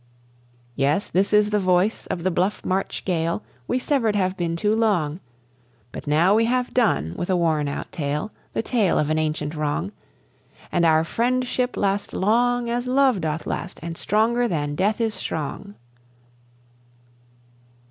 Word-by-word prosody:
Yes, 140 +8 +1
this 195 +2 +2
is 210 0 +4
the 210 - +2
voice 185 +3 +1
of 170 - -3
the 185 - +1
bluff 185 +4 -1
March 190 +1 -2
gale; 170 -2 -1 0.2
We - - +1
severed 250 -5 +1
have 185 -2 +1
been 170 -3 -2
too 210 +5 +1
long, 185 -9 +1 0.7
But - - -8
now 160 +6 +4
we 225 +2 +4
have 250 +1 0
done 195 - +1
with 175 - -4
a 185 - +3
worn 160 -4 +1
out 140 - -5
tale 150 +5 -3 0.2
The - - -1
tale 220 -8 +1
of 150 0 +1
an 155 - +2
ancient 155 -1 -2
wrong 155 +5 -2 0.8
And 170 -1 +3
our 160 0 +4
friendship 250 +5 0
last 200 0 0
long 240 +4 +2
as 240 +1 -2
love 260 -5 +3
doth 160 0 -2
last 175 - -4
and 170 0 -5
stronger 230 +6 +1
than 145 -7 -2
death 200 +8 0
is 225 -2 0
strong. 200 +7 -5
190 Hz, 160 wpm, -23 LUFS, 160-225 Hz, 0.8 s, is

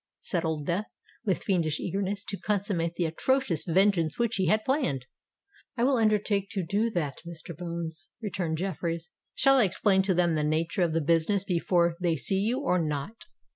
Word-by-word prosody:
said 175 -3 -1
Old 160 -3 -2
Death, 185 +7 -1 0.4
with 190 -4 0
fiendish 165 -6 0
eagerness 200 +2 -2
to 200 - -4
consummate 195 -5 -1
the 175 - 0
atrocious 175 - 0
vengeance 175 -2 +2
which 235 -2 0
he 190 -2 +1
had 215 +5 +2
planned. 260 - 0 0.7
"I 235 - +1
will 265 0 +3
undertake 210 -2 +1
to 190 -5 -2
do 205 +7 +1
that, 155 -9 -2
Mr. 170 -1 -9
Bones," 165 -3 -6
returned 180 -7 -2
Jeffreys. 170 -2 -3 0.2
"Shall 270 +1 +5
I 230 - +5
explain 190 +1 +3
to 190 -1 +1
them 175 -1 +3
the 155 -1 0
nature 160 +4 0
of 170 -2 +2
the 165 - +2
business 170 +6 +2
before 170 -2 +1
they 170 -2 +2
see 190 +6 0
you, 235 +7 0
or 180 -11 +1
not?" 155 - -4
180 Hz, 180 wpm, -28 LUFS, 165-205 Hz, 0.7 s, Shall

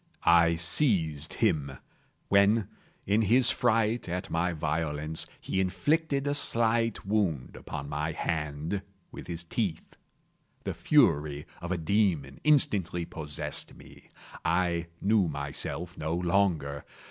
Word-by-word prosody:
I 85 0 +5
seized 80 - +1
him; 75 - +1 0.5
when, 100 +2 +4 0.4
in 105 +3 +2
his 120 +3 +4
fright 115 -4 +1
at 90 +1 -4
my 85 +2 +1
violence, 80 0 -2
he 95 - -1
inflicted 140 - 0
a 145 - +1
slight 115 -5 +2
wound 95 -10 -1
upon 70 -1 -7
my 75 +2 -2
hand 80 +4 -3 0.3
with - - -9
his 85 0 -4
teeth. 85 -1 -3 0.7
The - - -3
fury 75 0 +2 0.2
of 85 - -5
a 90 - 0
demon 80 -6 0
instantly 95 - +3
possessed 75 -3 -2
me. - - -16 0.3
I 85 0 0 0.2
knew 100 -2 +3
myself 75 +4 -4
no 80 +2 -2
longer. 85 -6 0
85 Hz, 120 wpm, -29 LUFS, 80-105 Hz, 0.7 s, I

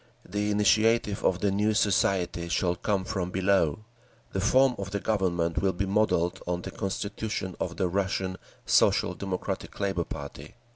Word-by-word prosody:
The 105 0 -1
initiative 105 0 +2
of 90 +1 +1
the 100 - +2
new 105 +2 +1
society 95 -4 +1
shall 85 0 +1
come 95 0 -1
from 95 -5 -2
below…. 95 -1 +1 0.5
The 95 - -2
form 130 +6 +4
of 100 -1 -4
the 100 +1 -2
Government 90 -6 0
will 95 -1 +2
be 100 +3 -1
modelled 95 -4 +1
on 90 0 -2
the - - -6
Constitution 100 -1 -3
of - - -3
the 95 - +1
Russian 95 0 -1 0.3
Social - - +3
Democratic 95 -2 -4
Labour 95 -4 0
Party. 70 0 -8
95 Hz, 155 wpm, -27 LUFS, 90-105 Hz, 0.5 s, form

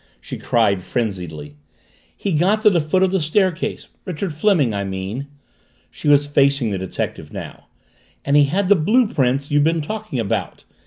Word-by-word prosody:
she - - -8
cried 105 -5 +1
frenziedly. 90 - -4 0.6
"He 200 - -2
got 195 +8 +2
to 210 - +6
the 170 -3 +2
foot 170 +5 +1
of 190 - +2
the 190 - +1
stair 185 +5 +2
case 170 +2 -5
Richard 180 -1 -4
Fleming, 155 - +2
I 100 0 -2
mean," 95 +8 -5 0.6
she - - -7
was 145 0 +5
facing 140 -4 +2
the 95 - -2
detective 95 -1 -5
now, - - -9 0.6
"and 140 - +2
he 145 -1 +6
had 185 +7 0
the 205 - +6
blue 215 +10 +3
print 140 - 0
you've 145 0 +3
been 165 +1 +1
talking 215 - -5
about. 110 -4 -3
145 Hz, 175 wpm, -20 LUFS, 115-185 Hz, 0.6 s, to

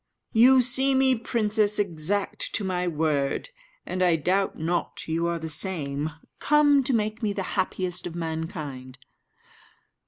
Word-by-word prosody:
"You 255 +3 +6
see 265 +2 +4
me, 265 0 +4
princess, 215 -3 +1
exact 195 +1 -1
to 210 - 0
my 180 -1 -1
word; 155 - -1 0.4
and 185 - -4
I 175 -2 +4
doubt 185 +5 0
not 170 +2 -3
you 165 +1 -1
are 170 0 -1
the 160 0 -6
same, 150 -3 -2 0.3
come 290 -2 +4
to 270 - +1
make 215 +1 -2
me 210 -3 -1
the 195 - -3
happiest 185 -2 -2
of 170 - -8
mankind." 155 -6 -5
185 Hz, 145 wpm, -25 LUFS, 160-215 Hz, 0.4 s, You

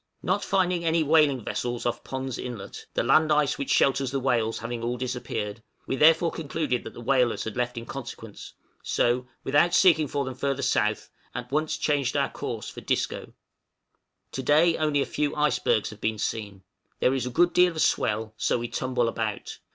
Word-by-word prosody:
Not 190 +3 0
finding 180 -3 +1
any 165 0 +2
whaling 150 -5 +3
vessels 120 -1 -3
off 120 - -2
Pond's 130 -1 -4
Inlet, 115 -6 -7
the - - +1
land 155 0 +4
ice 150 -1 +2
which 140 - -3
shelters 135 -1 +3
the 135 +1 -1
whales 120 -4 0
having 120 0 -5
all 120 +1 -2
disappeared, 115 -4 -4 0.2
we - - -2
therefore 165 +4 +5
concluded 150 -5 -2
that - - -9
the - - -9
whalers 125 -1 +2
had 110 - -5
left 125 0 -2
in 115 - -5
consequence, 115 -5 -9 0.3
so, 125 +1 0 0.2
without 150 +6 +3
seeking 160 -5 +5
for 140 0 -2
them 130 - -4
further 140 +1 -2
south, 110 -5 0 0.2
at 125 +1 -6
once 155 +2 0
changed 140 -4 0
our - - +1
course - - -5
for - - -8
Disco. - - -2 1.0
To 130 - -4
day 160 +5 +4
only 150 -2 +1
a - - 0
few 150 -1 -2
icebergs 150 -8 +1
have 105 - -13
been 110 0 -1
seen. 100 -3 -4 0.4
There 130 - +3
is 130 -2 -1
a - - -2
good 175 +7 +3
deal 180 -1 +4
of 160 - -2
swell, 110 +1 0
so - - +1
we 120 0 -4
tumble 130 -2 0
about. 110 -2 -4
130 Hz, 190 wpm, -26 LUFS, 120-150 Hz, 1.0 s, therefore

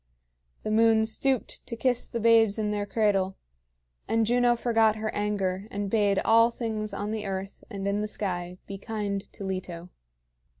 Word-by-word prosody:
The 215 - -2
moon 220 0 +4
stooped 260 +3 -1
to 230 - -4
kiss 245 +1 0
the 235 - -3
babes 225 -2 +4
in 210 -1 -1
their 205 -1 -2
cradle; 195 -3 +1 0.7
and 225 0 +2
Juno 240 +1 +3
forgot 225 -2 +3
her 215 0 -3
anger, 200 -2 -1
and 200 -1 -4
bade 205 -3 +2
all 230 +1 +6
things 220 -3 -3
on 205 +1 -3
the 215 -2 -3
earth 195 0 -5
and 195 -1 -4
in 200 +1 0
the 210 - -1
sky 180 -4 -4
be 195 -1 -7
kind 205 -2 -4
to - - -9
Leto. 180 -2 -5
210 Hz, 170 wpm, -27 LUFS, 195-225 Hz, 0.7 s, all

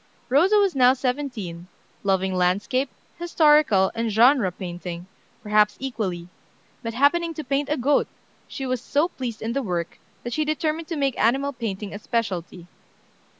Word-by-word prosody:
Rosa 335 +11 +4
was 400 -2 +3
now 255 -1 +6
seventeen, 250 -10 -4 0.3
loving 190 -1 +1
landscape, 200 +9 +1 0.3
historical, 300 - +4
and 230 -1 -2
genre 230 -2 +4
painting, 175 -1 -7 0.4
perhaps 210 0 +3
equally; 200 -10 -4 0.5
but 230 -2 -5
happening 330 +5 +2
to 310 - -5
paint 280 +1 -1
a 300 - 0
goat, 280 +3 +2 0.4
she 270 - -6
was 255 -2 -2
so 295 +6 +1
pleased 240 -9 -6
in 225 +1 -2
the 275 - 0
work, 175 -7 -3 0.2
that 240 - -4
she 310 - +1
determined 310 +1 -2
to 330 - -3
make 275 -3 0
animal 270 +5 +2
painting 210 -4 -5
a 205 - -6
specialty. 185 -7 -3
245 Hz, 150 wpm, -24 LUFS, 195-285 Hz, 0.5 s, now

